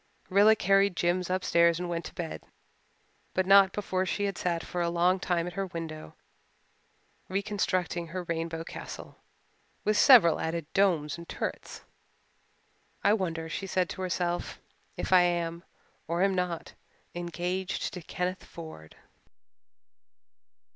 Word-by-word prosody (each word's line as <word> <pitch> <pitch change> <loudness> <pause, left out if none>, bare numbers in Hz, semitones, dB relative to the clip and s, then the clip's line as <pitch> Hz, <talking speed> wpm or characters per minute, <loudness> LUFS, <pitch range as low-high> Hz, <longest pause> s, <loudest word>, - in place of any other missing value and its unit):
Rilla 205 +3 +6
carried 195 -1 +3
Jims 175 +1 0
upstairs 170 -2 +3
and 180 - -3
went 170 -1 -3
to - - -8
bed, 170 -2 -5 0.9
but 185 - +2
not 195 0 +7
before 190 -2 -1
she 205 +2 -2
had 200 -2 -1
sat 170 -1 -1
for 180 - -3
a 170 - +1
long 175 +2 +2
time 175 -2 0
at 180 - -6
her 195 +1 -2
window 160 - -7 1.1
reconstructing 185 -3 -1
her 180 +3 -5
rainbow 165 -1 -3
castle, - - -9 0.6
with 215 - +2
several 210 - +7
added 165 0 -2
domes 170 -6 +2
and 170 - -11
turrets. - - -5 1.2
"I 205 - +5
wonder," 165 -6 -2
she 195 +4 -4
said 185 -1 0
to - - -6
herself, 175 -1 -2 0.4
"if - - -1
I 185 - +8
am, 170 -1 0 0.4
or 170 +3 +1
am 195 0 +3
not, 180 -3 -3 0.4
engaged 180 +3 -3
to 180 - -6
Kenneth 180 +3 -3
Ford." 160 - -11
180 Hz, 135 wpm, -29 LUFS, 170-190 Hz, 1.2 s, I